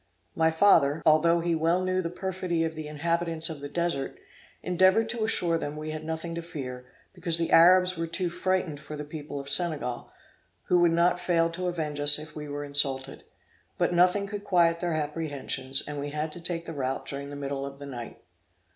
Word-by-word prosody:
My 160 0 +3
father, 160 -4 +3
although 165 +2 +4
he 170 0 0
well 165 +2 +1
knew 185 0 0
the 170 - -3
perfidy 180 -2 -2
of 160 0 -2
the 155 -1 -7
inhabitants 165 +1 -1
of 155 - -7
the 145 0 -7
Desert, 170 -4 -2 0.5
endeavored 185 +5 +3
to 230 -1 -2
assure 175 -6 +1
them 145 -1 -5
we 155 0 -5
had 155 0 -6
nothing 160 +1 -4
to 170 - -4
fear, 125 -6 -7 0.3
because 170 -3 -1
the 165 -1 -2
Arabs 180 +2 +6
were 165 - -2
too 180 +2 -2
frightened 180 -4 -1
for 150 0 -9
the 150 - -6
people 145 -1 -7
of 140 - -8
Senegal, 145 -4 0 0.5
who 180 - +2
would 175 -1 +4
not 170 +2 +2
fail 170 -2 +1
to 180 +2 -4
avenge 155 -4 -3
us 145 0 +9
if 155 +1 -8
we 150 -1 -7
were 145 0 -4
insulted; 135 -2 +2 0.5
but - - +1
nothing 180 +3 +3
could 205 0 -6
quiet 170 -4 +2
their 175 -1 -2
apprehensions, 145 -3 -1
and 145 -1 -5
we 145 +1 -4
had 150 +1 -3
to 170 - -8
take 170 -1 -3
the 165 - -6
route 135 -2 -3
during 140 0 -6
the 145 - -8
middle 140 -1 -4
of 140 0 -7
the 140 - -9
night. 120 -4 -9
160 Hz, 205 wpm, -27 LUFS, 145-175 Hz, 0.5 s, us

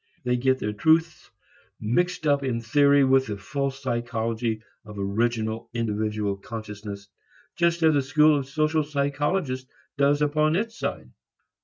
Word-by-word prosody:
They 125 -1 +1
get 130 +1 +2
their 105 -4 -3
truths 160 +8 +1 0.5
mixed 175 +10 0
up 145 -1 +3
in 130 -4 -1
theory 140 +4 +4
with 135 0 +3
the 105 -1 -4
false 135 +7 -3
psychology 115 -2 -2 0.2
of 105 -2 -11
original 110 +3 -1
individual 105 -3 -1
consciousness, 105 -3 -8 0.5
just 170 -1 +1
as 160 -1 +5
the 145 - +3
school 150 +3 +4
of 135 - -6
social 155 +2 +1
psychologists 145 -1 -1 0.3
does 145 +1 +3
upon 155 +1 +2
its 225 +4 -2
side. - - -4
130 Hz, 140 wpm, -25 LUFS, 110-150 Hz, 0.5 s, as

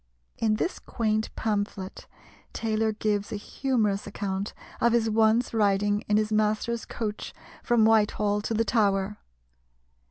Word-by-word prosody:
In 220 -1 +2
this 345 - -2
quaint 215 -2 -1
pamphlet 205 -3 -3 0.5
Taylor 220 -1 0
gives 210 0 -1
a - - -2
humorous 210 -2 -1
account 200 0 -3 0.3
of 235 0 +4
his 225 -2 +2
once 220 +2 +3
riding 205 -1 +2
in 210 - +4
his 215 0 0
master's 215 +2 0
coach 215 -3 -5 0.3
from 235 -3 +3
Whitehall 210 -1 +3
to 225 +2 -2
the 225 +1 +2
Tower. 205 -3 +1
215 Hz, 130 wpm, -27 LUFS, 205-225 Hz, 0.5 s, of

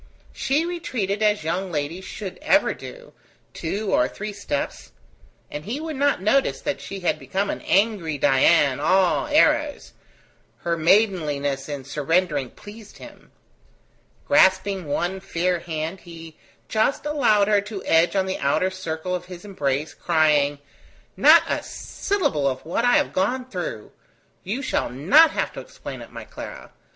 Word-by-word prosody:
She 295 +5 0
retreated 230 - -3
as 210 -4 +2
young 180 +4 -2
ladies 160 +5 -3
should 195 -4 -7
ever 300 -1 +3
do, - - -11 0.4
two 195 +5 -3
or 125 - +3
three 210 +8 -6
steps, 200 -8 -4 0.6
and 150 0 -6
he 245 +7 -3
would 315 -1 -5
not 280 -8 +1
notice 265 +7 +2
that 290 - -3
she 195 -1 -7
had 170 -3 0
become 190 +9 -2
an - - -6
angry 195 -7 +1
Dian, 135 0 +4
all 185 +4 +2
arrows: 300 0 +2 0.7
her 170 0 0
maidenliness 155 -7 +1
in 145 -2 -5
surrendering 150 0 0
pleased 210 - -13
him. - - -14 1.0
Grasping 190 - +3
one 175 +6 -1
fair 180 -1 -1
hand, 160 +2 -4
he 165 -2 -12 0.3
just 220 +7 0
allowed 240 -9 +3
her 205 -1 +3
to 205 -1 -8
edge 165 +4 +3
on 190 -1 +2
the 190 - -3
outer 160 +7 +1
circle 180 -1 -4
of 180 -1 -3
his 180 +1 -10
embrace, 150 -6 -2
crying: 150 -4 +2 0.6
"Not - - +7
a - - -1
syllable 290 - -2
of 130 +1 -3
what 175 +8 -1
I 245 - +4
have 295 -1 +2
gone 250 +7 0
through! - - -5 0.5
You 225 +9 -3
shall - - -1
not 230 - +5
have - - -2
to - - -7
explain - - -9
it, - - -11
my - - -8
Clara. - - -10
190 Hz, 150 wpm, -23 LUFS, 160-220 Hz, 1.0 s, Not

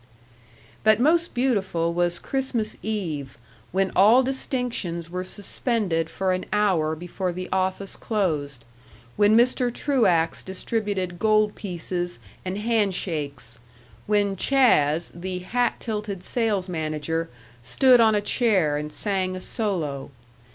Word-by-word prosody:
But 215 0 +5
most 330 +6 +2
beautiful 195 -10 0
was 175 0 +1
Christmas 245 -1 -2
Eve, 160 - -4 0.3
when 190 +1 +1
all 220 +7 +6
distinctions 245 - -2
were 180 +1 -3
suspended 190 - -1
for 190 -1 -1
an 185 - -3
hour 185 -7 +2
before 175 +3 -4
the 185 +1 -5
office 190 +1 -1
closed, 150 - -2 0.5
when 210 +1 +5
Mr. 245 +1 +3
Truax 200 - +1
distributed 190 -2 -3
gold 215 0 +3
pieces 175 -2 -4 0.3
and 185 +1 -3
handshakes, 185 - -1 0.5
when 205 -1 +2
"Chas.," 175 - +3
the 180 +2 -5
hat 240 +7 -1
tilted 210 -4 -4
sales 210 -6 0
manager, 160 -1 -2 0.3
stood 255 - +4
on 220 -2 +5
a 205 - +2
chair 200 - +2
and 150 0 -5
sang 190 0 -1
a - - -5
solo. 165 - -2
190 Hz, 120 wpm, -24 LUFS, 170-220 Hz, 0.5 s, all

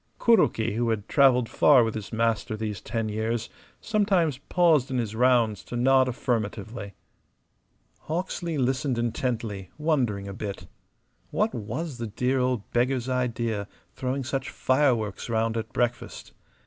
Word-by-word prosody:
Kuroki, 115 - +3
who 115 +2 0
had 110 -2 -2
travelled 130 -4 +4
far 135 0 +5
with 110 -1 -1
his 110 -2 -6
master 115 -1 0
these 105 -3 -4
ten 115 -1 -2
years, 110 +2 -2 0.3
sometimes 195 - +1
paused 160 -4 +3
in 130 - -1
his 110 -3 -2
rounds 120 -3 +3
to - - -7
nod 130 +1 +4
affirmatively. 110 -4 -3 1.1
Hawksley 170 0 -3
listened 130 0 0
intently, 115 -5 -2
wondering 125 -11 0
a 100 - -6
bit. 100 -1 -6 0.6
What 215 +1 0
was 125 +6 -5
the 115 - -3
dear 125 +5 0
old 125 -4 0
beggar's 125 +1 +1
idea, 115 -5 -1 0.3
throwing 130 +1 -2
such 135 +1 -3
fireworks 125 -7 +1
round 115 0 0
at 110 0 -4
breakfast? 120 0 -3
120 Hz, 135 wpm, -26 LUFS, 110-135 Hz, 1.1 s, far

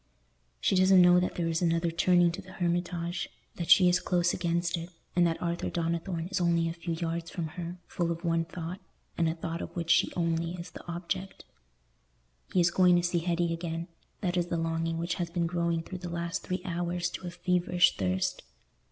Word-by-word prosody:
She 190 - +2
doesn't 185 0 +6
know 175 0 +7
that 180 - -1
there 170 -1 -1
is 165 +1 0
another 165 0 +1
turning 175 0 +4
to 175 - -6
the 185 0 -13
Hermitage, 175 0 -1 0.3
that 170 -2 -4
she 180 +1 +8
is 180 +1 +4
close 175 -1 +1
against 170 0 0
it, 170 0 -6 0.3
and 175 -1 +5
that 165 - -1
Arthur 170 0 -2
Donnithorne 170 0 -2
is 200 - 0
only 170 -1 +2
a 165 - -2
few 170 0 -4
yards 165 0 -3
from 165 -3 -4
her, 175 +2 -6
full 170 -1 -2
of 170 +1 -5
one 165 0 +1
thought, 175 +1 -6 0.4
and 165 -1 +2
a 160 - -2
thought 165 0 -4
of - - -7
which 170 -1 -1
she 175 - +4
only 165 0 0
is 175 -1 -8
the - - -10
object. 185 +3 -4 1.1
He 185 - +2
is 175 0 +4
going 180 0 +5
to 175 - +2
see 175 0 +1
Hetty 170 0 0
again: 165 0 -4 0.3
that 180 -3 0
is 175 -1 +1
the 170 - -1
longing 165 0 -1
which 170 +1 -1
has 170 - -2
been 170 0 0
growing 170 -1 0
through 185 +2 -7
the 175 -1 -6
last 170 0 -3
three 185 0 -4
hours 175 0 -1
to 180 - -6
a - - -2
feverish 180 0 +2
thirst. 95 -1 -1
170 Hz, 210 wpm, -29 LUFS, 165-180 Hz, 1.1 s, she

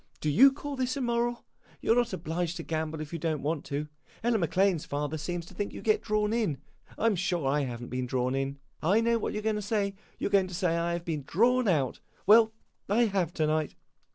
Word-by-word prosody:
Do 150 - 0
you 270 - +8
call 285 +1 -6
this 255 0 -1
immoral? 240 -2 -1 0.3
You - - 0
're - - +6
not 240 -1 +2
obliged 170 +2 -2
to 165 - -5
gamble 160 -1 -3
if 155 +1 -7
you 165 - -3
don't 155 -3 -1
want 155 0 -1
to. 145 +2 -3 0.4
Ella 235 -1 +2
Maclane's 185 -1 +2
father 145 +1 -3
seems 170 +3 -4
to - - -14
think 205 - -3
you - - -7
get 215 -1 +3
drawn 215 0 0
in. 215 -12 0 0.4
I - - -1
'm 225 -3 +4
sure 175 -5 -1
I 140 +1 +2
have 120 -1 -5
n't 120 - -9
been 125 0 -2
drawn 125 0 0
in. 135 +1 -2 0.2
I 190 +7 +3
know 230 0 +2
what - - -2
you - - -3
're - - -12
going 220 -1 +1
to - - -3
say 205 -1 0 0.2
you - - -3
're - - -6
going 195 -2 +4
to 180 - -7
say 175 -2 +1
I 170 0 0
have 170 0 -4
been 155 -3 -2
drawn 245 +5 +3
out. 145 -9 +1 0.3
Well, 220 +2 +7 0.4
I 230 +4 +4
have, 190 -6 0
to 155 - +1
night. 155 0 0
175 Hz, 245 wpm, -29 LUFS, 155-220 Hz, 0.4 s, you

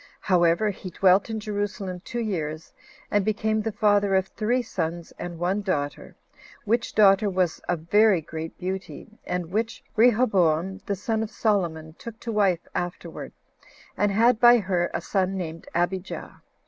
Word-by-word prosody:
However, 180 +3 +3
he 190 -1 -8
dwelt 190 +4 +3
in 220 -1 -3
Jerusalem 205 -3 -4
two 240 +2 -4
years, 160 -7 -4 0.4
and 205 -1 +3
became 215 +1 0
the 225 +1 -2
father 205 -1 +2
of 190 0 +1
three 240 +3 0
sons, 170 -5 -4
and 175 -1 -6
one 180 +4 0
daughter; 145 -8 -3 0.5
which 230 +3 0
daughter 205 0 +5
was 185 -3 0
of 175 -3 0
very 205 +3 +4
great 160 +1 -7
beauty, 190 +4 -6
and 180 -2 -3
which 225 +3 -2
Rehoboam, 195 -7 +3
the 200 - 0
son 220 +3 -2
of 220 - -3
Solomon, 170 -9 -1
took 230 -1 -9
to 235 - -4
wife 195 -5 +1
afterward, 175 0 -5 0.6
and 205 0 +1
had 230 +3 +4
by 240 0 +8
her 185 -5 0
a - - -3
son 190 -1 -1
named 165 -2 -6
Abijah. 180 +2 -3
195 Hz, 155 wpm, -25 LUFS, 175-215 Hz, 0.6 s, by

